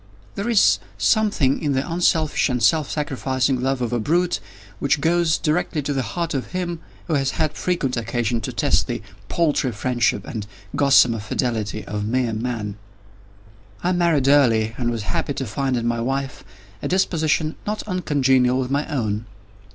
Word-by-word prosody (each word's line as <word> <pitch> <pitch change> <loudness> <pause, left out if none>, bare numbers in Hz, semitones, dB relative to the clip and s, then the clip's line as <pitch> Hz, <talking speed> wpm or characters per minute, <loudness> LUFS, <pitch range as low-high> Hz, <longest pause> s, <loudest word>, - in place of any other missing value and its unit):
There 200 +4 -3
is 225 -4 +5 0.2
something 205 - +2
in 145 -3 0
the 135 +1 -1
unselfish 165 -3 +1
and 125 -2 -1
self 155 -4 +3
sacrificing 130 -3 -1
love 135 -1 0
of 120 - -2
a 120 - +1
brute, 175 +9 +1 0.4
which 140 +1 +1
goes 165 0 +2
directly 155 -1 0
to 145 - -1
the 135 - 0
heart 165 +9 -3
of 135 +5 -4
him 175 -2 -2 0.3
who 165 - -2
has 135 -2 0
had 155 -1 +1
frequent 160 -9 -1
occasion 115 0 -1
to - - -4
test - - +1
the - - -4 0.3
paltry 150 -6 +1
friendship 115 -2 0
and 105 -3 -5 0.3
gossamer 130 -5 +5
fidelity 110 -1 -2
of 105 0 -3
mere 120 0 0
Man. 110 -3 -3 1.1
I 180 - +2
married 170 -6 +2
early, 115 -6 +4
and 120 -1 -1
was 115 -3 -3
happy 140 +6 -2
to 135 - -3
find 130 +3 -1
in 115 - -2
my 120 0 0
wife 135 +2 -3 0.4
a - - -2
disposition 160 -4 +1
not 210 +1 -2
uncongenial 135 - +2
with 130 0 -2
my 145 +2 0
own. 110 -6 -2
135 Hz, 165 wpm, -22 LUFS, 120-160 Hz, 1.1 s, is